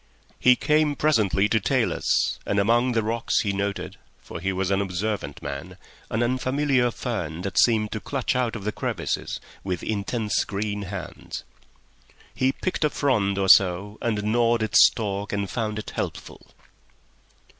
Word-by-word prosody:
He 125 0 +6
came 150 +2 +2
presently 105 -10 +2
to 110 - +3
talus, 95 - +1
and 100 - -1
among 120 +5 +3
the 115 -1 +1
rocks 115 +2 0
he 100 -2 -1
noted—for 100 -3 -5
he 95 +3 -1
was 95 0 -1
an 100 0 +2
observant 95 -5 -3
man—an 70 +10 -5
unfamiliar 130 +1 +1
fern 90 -9 -4
that 100 - 0
seemed 110 -3 +3
to 110 - -3
clutch 130 +2 -2
out 125 -2 0
of 105 - -6
the 105 - -1
crevices - - -3 0.2
with 90 -2 -3
intense 105 +1 -1
green 105 0 -3
hands. 90 -3 -7 0.9
He 130 +1 +2
picked 185 +4 -3
a 150 - +3
frond 105 -10 +1
or 95 -1 +1
so 95 +2 +4
and 110 -4 -1
gnawed 115 +1 +2
its 110 - +7
stalk, 100 -2 -3
and 100 -1 -1
found 110 0 -3
it 110 - -6
helpful. - - -6
105 Hz, 150 wpm, -25 LUFS, 100-120 Hz, 0.9 s, its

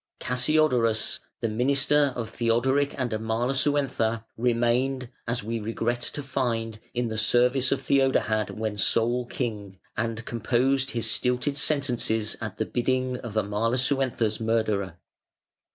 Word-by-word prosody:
Cassiodorus, 125 -4 +2 0.2
the - - +1
minister 140 +5 +2
of 115 -2 -3
Theodoric 130 +5 +1
and 125 -3 -1
Amalasuentha, 115 +1 0
remained, 125 +2 +1 0.2
as 115 -2 -2
we 115 +2 -3
regret 115 +2 -2
to 145 +4 -5
find, 115 -5 -2 0.2
in 120 -1 0
the 110 0 -2
service 125 +3 +3
of 140 - +1
Theodahad 130 -6 +2
when 110 -1 -4
sole 120 +4 +2
king 105 -7 -4 0.2
and 115 0 -3
composed 130 +4 +1
his 115 -3 -1
stilted 125 +5 +1
sentences 120 -7 +1
at 105 -4 -5
the 110 - -1
bidding 130 +1 -1
of 115 -3 -8
Amalasuentha's 115 +2 0
murderer. 110 -5 0
120 Hz, 120 wpm, -26 LUFS, 110-130 Hz, 0.2 s, service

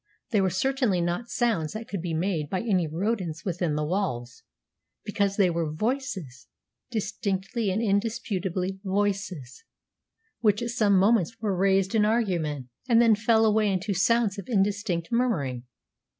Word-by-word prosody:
They 210 -4 +3
were 190 - +2
certainly 245 0 +1
not 175 +7 -2
sounds 215 -11 0
that 220 +1 -6
could 195 -4 -4
be 170 -2 -3
made 160 -3 -1
by 185 - -1
any 190 -7 +1
rodents 175 -1 -2
within 175 -4 -1
the 150 0 -1
walls, 150 -10 -3 0.6
because 200 -1 0
they 190 -4 +4
were 165 -2 -1
voices, 195 - -3 0.4
distinctly 210 -1 -2
and 205 +5 0
indisputably 195 -3 -1
voices, 190 - -2 0.8
which 210 0 +2
at 235 - -2
some 215 -5 +3
moments 220 +2 +2
were 210 -4 -1
raised 195 +1 +2
in 220 -2 +3
argument, 175 - 0 0.2
and 230 -1 +6
then 230 -2 +6
fell 220 +1 +3
away 215 -1 +3
into 195 +2 -1
sounds 220 +1 +2
of 195 - -8
indistinct 195 -5 0
murmuring. 150 - 0
195 Hz, 150 wpm, -26 LUFS, 175-220 Hz, 0.8 s, and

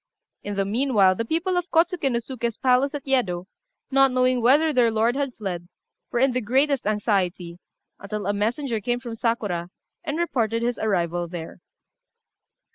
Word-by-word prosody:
In 205 0 -5
the 195 0 0
meanwhile 210 -3 +3
the 230 - -2
people 335 +7 -1
of 355 +1 -2
Kôtsuké 330 -4 +2
no 235 - +1
Suké's 235 -1 -4
palace 260 +2 +2
at 285 - -6
Yedo, 205 -10 0 0.5
not 270 0 +5
knowing 255 0 +2
whether 295 +6 +4
their 245 -3 +4
lord 225 +2 +1
had 275 -3 -2
fled, 180 -5 -5 0.4
were - - -1
in 265 +2 +3
the 255 +1 -1
greatest 265 +3 +1
anxiety, 190 -5 -1 0.4
until 205 0 -5
a 205 - +1
messenger 225 +3 -1
came 240 +3 -1
from 240 -2 -7
Sakura, 215 -7 -2 0.3
and 295 0 -3
reported 230 -9 0
his 240 0 -1
arrival 175 -4 0
there. 165 -1 -8
235 Hz, 165 wpm, -24 LUFS, 200-270 Hz, 0.5 s, not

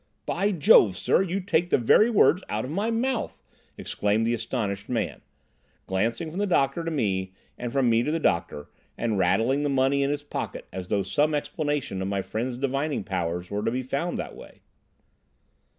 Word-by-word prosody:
"By 200 +4 0
Jove, 125 - +5
sir, - - +2
you 190 0 -1
take 175 -2 +1
the - - +4
very 170 - +5
words 200 -5 +4
out 110 +2 -2
of 130 - -6
my 200 +7 -1
mouth!" 235 +2 -2 0.3
exclaimed 105 +2 0
the 115 - +1
astonished 110 -4 -3
man, 115 -4 -2 0.6
glancing 115 - -1
from 180 - -5
the 205 - +1
doctor 170 -1 +1
to 165 - -2
me 95 - -1 0.2
and 120 -1 -5
from 135 -1 +2
me 115 0 +4
to 135 - -1
the 165 +2 0
doctor, 85 - -1 0.3
and 110 -4 -1
rattling 110 +10 +2
the 145 - 0
money 135 +1 +2
in 140 - +1
his 145 0 -2
pocket 145 - -5
as 90 -1 -5
though 100 0 0
some 145 +11 +1
explanation 145 - -2
of 95 - -2
my 100 -1 -1
friend's 120 +5 -3
divining 140 0 -1
powers 90 -1 -3
were 100 0 -1
to - - +1
be 125 +3 -2
found 140 +7 -2
that - - -5
way. - - -14
130 Hz, 190 wpm, -26 LUFS, 100-155 Hz, 0.6 s, Jove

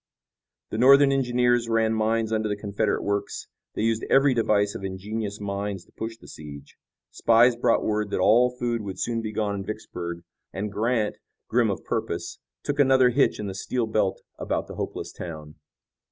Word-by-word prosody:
The 110 - -3
Northern 140 +2 +7
engineers 120 -3 +2
ran 110 -1 +2
mines 110 0 0
under 110 -1 0
the 105 - 0
Confederate 105 +1 -1
works. 100 0 -2 0.3
They - - -1
used 115 0 +1
every 135 0 +5
device 105 -3 +2
of - - -7
ingenious 100 +2 -4
minds 100 -2 -4
to - - -26
push 115 0 -6
the - - -16
siege. 70 -2 -11 0.4
Spies 115 +2 +4
brought 120 -1 +2
word 105 -1 -1
that - - -2
all 115 +6 +5
food 120 -2 -2
would 95 -2 -6
soon 115 -1 -1
be 110 -1 -4
gone 105 -1 -1
in 100 -1 -4
Vicksburg, 85 -5 -6 0.3
and 105 +2 -4
Grant, 110 0 0 0.3
grim - - +2
of - - -3
purpose, - - -3 0.2
took 145 0 -3
another 130 -2 +5
hitch - - +2
in 105 - -3
the 95 - -4
steel 115 +5 -2
belt 105 -3 0 0.2
about - - -2
the - - -9
hopeless - - -5
town. 75 -3 -8
110 Hz, 180 wpm, -25 LUFS, 100-120 Hz, 0.4 s, Northern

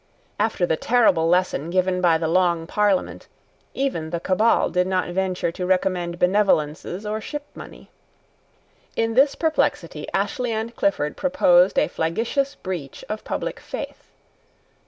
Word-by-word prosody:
After 210 -4 +1
the 160 -2 0
terrible 195 -9 +3
lesson 175 -3 +1
given 185 0 +1
by 170 -2 +4
the 160 0 -2
Long 170 -1 +2
Parliament, 205 +1 0 0.5
even 260 -13 -2
the 170 +1 -3
Cabal 200 +6 +2
did 180 0 +1
not 185 -1 0
venture 185 -1 -1
to 180 - -6
recommend 180 -1 0
benevolences 180 -1 +1
or 215 +1 -3
shipmoney. 295 +5 -9 1.1
In 225 0 0
this 275 +3 +4
perplexity 320 -1 -1
Ashley 250 -5 -1
and 225 +2 -4
Clifford 150 -9 0
proposed 195 -10 +3
a - - +4
flagitious 230 +12 -1
breach 170 -8 -6
of 215 0 -4
public - - -4
faith. - - -8
185 Hz, 135 wpm, -23 LUFS, 175-225 Hz, 1.1 s, by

